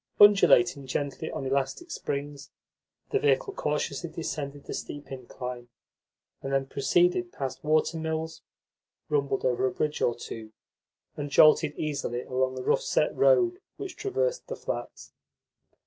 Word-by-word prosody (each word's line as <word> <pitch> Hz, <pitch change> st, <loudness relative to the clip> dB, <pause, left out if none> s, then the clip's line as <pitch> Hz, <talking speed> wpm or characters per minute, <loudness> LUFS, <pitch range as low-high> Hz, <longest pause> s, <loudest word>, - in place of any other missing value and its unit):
Undulating 140 Hz, -10 st, +6 dB
gently 140 Hz, +1 st, -3 dB
on 135 Hz, -, -5 dB
elastic 135 Hz, -, -1 dB
springs, 145 Hz, 0 st, -4 dB, 0.6 s
the 415 Hz, -, +2 dB
vehicle 440 Hz, 0 st, +2 dB
cautiously 150 Hz, -, -2 dB
descended 145 Hz, -3 st, -5 dB
the -, -, -6 dB
steep 145 Hz, -1 st, -7 dB
incline, 125 Hz, -1 st, -7 dB, 0.7 s
and 135 Hz, -, -4 dB
then 135 Hz, 0 st, +1 dB
proceeded 175 Hz, +6 st, +2 dB
past 135 Hz, -3 st, -5 dB
water 155 Hz, +2 st, +2 dB
mills, 160 Hz, 0 st, -3 dB, 0.7 s
rumbled 140 Hz, -2 st, 0 dB
over 130 Hz, 0 st, +2 dB
a -, -, -1 dB
bridge 150 Hz, -1 st, -2 dB
or 120 Hz, -, +2 dB
two, 110 Hz, -1 st, -8 dB, 0.6 s
and 145 Hz, -1 st, -4 dB
jolted 155 Hz, +1 st, +5 dB
easily 140 Hz, -5 st, -2 dB
along 130 Hz, 0 st, -1 dB
the 130 Hz, -, -5 dB
rough -, -, +2 dB
set -, -, +1 dB
road 365 Hz, -7 st, +4 dB, 0.2 s
which 380 Hz, -3 st, -6 dB
traversed 470 Hz, +5 st, -1 dB
the -, -, -4 dB
flats. -, -, -6 dB
145 Hz, 135 wpm, -28 LUFS, 135-170 Hz, 0.7 s, Undulating